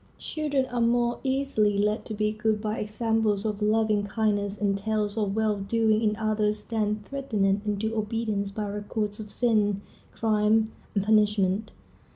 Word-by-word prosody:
Children 290 -4 -1
are 245 -2 -2
more 240 +1 +2
easily 265 -7 +1
led 210 +2 0
to 220 - -5
be 210 0 +1
good 215 0 0
by 215 0 -2
examples 215 -1 0
of 210 -1 -2
loving 215 -1 +2
kindness 205 -1 0
and 200 -1 +1
tales 210 0 -1
of 205 -3 -1
well 215 -1 +1
doing 220 +2 +2
in 215 -1 +2
others 215 -1 0
than 210 -2 -1
threatened 210 -8 0
into 215 +2 -1
obedience 215 -2 -1
by 210 +1 -4
records 205 +1 -3
of 210 -1 -7
sin, 210 -4 +1 0.3
crime, 220 0 +2 0.2
and 200 - +2
punishment. 210 -1 +2
215 Hz, 155 wpm, -27 LUFS, 205-225 Hz, 0.3 s, more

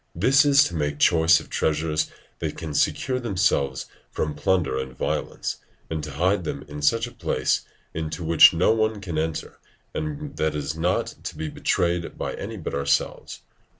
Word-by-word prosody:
This 130 - +4
it - - +4
is 140 0 +7
to - - -3
make 75 -2 -1
choice 80 +1 +5
of 80 - -11
treasures 75 0 0 0.3
that - - -3
can 80 -2 -5
secure 125 - +1
themselves 90 - 0 0.2
from 75 -1 -2
plunder 80 0 +1
and 65 -1 -6
violence, - - -2 0.3
and 80 -1 -2
to 75 - -5
hide 90 +6 +1
them 70 -3 -5
in 75 0 -7
such 115 +11 +2
a 120 - -9
place - - 0 0.3
into 80 +1 -4
which 80 0 +8
no 85 +4 +3
one 110 -1 +1
can 85 -6 -3
enter 80 0 -4 0.3
and 150 -2 -5
that 80 -1 0
is 75 +1 -3
not 85 +3 0
to - - -6
be 80 -1 -3
betrayed 85 +2 -1
by - - -3
any - - -6
but - - -5
ourselves. 70 0 -1
80 Hz, 180 wpm, -24 LUFS, 75-95 Hz, 0.3 s, which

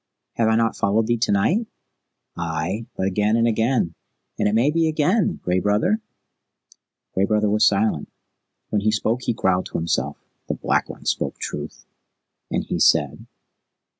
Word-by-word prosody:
"Have 115 - +1
I 110 - +3
not 115 0 +1
followed 105 +3 +1
thee 120 0 0
to 120 - +1
night?" 180 - +2 0.7
"Ay, 85 +7 -3
but 95 - 0
again 105 +3 +1
and 115 0 +3
again, 115 -5 +1 0.5
and - - +2
it 105 - +1
may 125 +6 +3
be 165 +1 +2
again, 160 +7 +1
Gray 90 +1 +1
Brother?" 105 - +1 1.1
Gray 95 - +2
Brother 105 0 +1
was 105 0 +4
silent. 100 -6 +1 0.6
When 105 - +1
he 110 - +2
spoke 110 +3 0
he 120 - -1
growled 95 -3 +1
to - - -4
himself, 85 0 -1 0.3
"The - - -2
Black - - 0
One - - -10
spoke - - -1
truth." 75 +1 -6 0.6
"And - - -1
he - - -3
said?" - - +2
110 Hz, 165 wpm, -22 LUFS, 100-120 Hz, 1.1 s, was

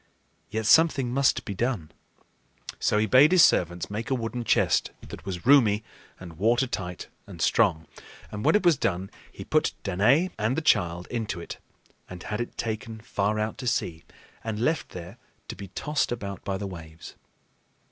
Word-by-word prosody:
Yet 110 0 -3
something 135 -3 +4
must 135 +1 +2
be 100 - -4
done. 105 -6 -2 0.9
So - - +1
he 105 - +3
bade 130 - +6
his 185 -3 +7
servants 85 +2 +2
make 110 +2 -4
a 135 - +1
wooden 120 0 -4
chest - - +2 0.2
that - - -10
was 90 -3 -5
roomy 115 -6 +5 0.4
and 85 -3 -11
watertight 110 -6 0 0.2
and - - -11
strong; 80 0 +2 0.5
and 105 0 -5
when - - +4
it 210 - +2
was 170 -5 +5
done, 95 -1 -2 0.2
he - - -10
put - - +1
Danaë 120 - +2
and 110 +5 0
the - - +1
child 90 - +1
into 110 -7 -3
it 85 - -8 0.5
and 90 -1 -9
had 105 +2 -3
it 120 - -6
taken 110 0 -4
far 105 -2 -1
out 110 0 -3
to 125 - -5
sea 85 -7 -1 0.4
and 110 -2 -3
left 155 +8 0
there 90 +6 -10 0.3
to - - -5
be 100 - -9
tossed 150 +10 -2
about 100 -5 -5
by 95 -1 -2
the 100 - -5
waves. 80 -3 -10
110 Hz, 175 wpm, -26 LUFS, 90-125 Hz, 0.9 s, his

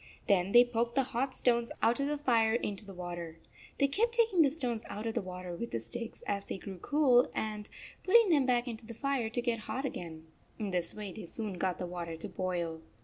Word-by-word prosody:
Then 195 -2 +3
they 240 +2 +8
poked 235 0 -1
the 270 - +4
hot 260 +1 -2
stones 235 -1 +2
out 230 +3 +4
of 280 - +1
the 295 0 0
fire 230 -6 +3
into 205 -3 -3
the 195 - -8
water. 175 -2 -6 0.4
They 280 - +4
33 - - +3 0.2
kept 470 0 +2
taking 445 -7 +4
the 290 - +6
stones 250 -6 -3
out 210 +2 -5
of 225 - -1
the 235 - 0
water 180 -1 -6
with 200 - -3
sticks 230 - -7
as 200 -1 -1
they - - -5
grew 190 -1 -8
cool 260 - +4
and 210 -1 -3 0.3
putting 450 +2 +6
them 280 -5 +4
back 245 0 +2
into 230 -1 -6
the 230 - -8
fire 275 -3 0
to 245 +2 -1
get 235 -2 0
hot 265 +5 -3
again. 165 -10 -6 0.3
In 210 -3 -3
this 175 -2 -1
way 210 -2 -5
they 220 - -7
soon 215 +2 -4
got 185 0 -1
the 180 - -3
water 170 -2 -5
to - - -6
boil. 170 -3 -2
225 Hz, 230 wpm, -32 LUFS, 185-250 Hz, 0.4 s, they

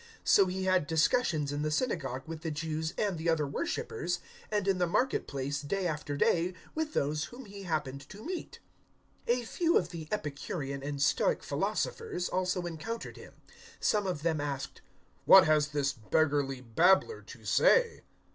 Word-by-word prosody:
017:017 470 - -20 0.2
So 195 - +7
he 190 +1 -3
had 185 -5 +2
discussions 160 - +2
in 145 0 -2
the 155 - 0
synagogue 150 - -1
with 160 -1 -7
the 160 - -3
Jews 160 +1 -3
and 195 -6 0
the 165 +1 0
other 160 -2 +2
worshippers, 170 +5 -2 0.3
and 210 -2 0
in 190 -2 +2
the 175 - +2
market 250 +10 +1
place, 140 +1 -3
day 185 +6 -2
after 150 -3 -2
day, 175 +4 +2 0.2
with 315 -1 -2
those 150 +2 0
whom 250 +1 -11
he 200 -1 -10
happened 140 -5 -3
to 210 +3 -11
meet. 360 +1 -5 0.7
017:018 240 +1 +3
A 240 - -7
few 335 +8 +2
of 175 - 0
the 165 -3 -7
Epicurean 140 -5 -4
and 140 0 -4
Stoic 140 - +2
philosophers 445 - -2
also 180 -1 -1
encountered 175 +8 -5
him. - - -12 0.5
Some 205 -2 +1
of 175 -5 -3
them 160 -3 +1
asked, 140 -2 -4 0.4
"What 195 - +9
has 155 -1 +3
this 145 -2 0
beggarly 140 +2 0
babbler 180 - +3
to - - -13
say?" - - +4
165 Hz, 175 wpm, -31 LUFS, 145-195 Hz, 0.7 s, What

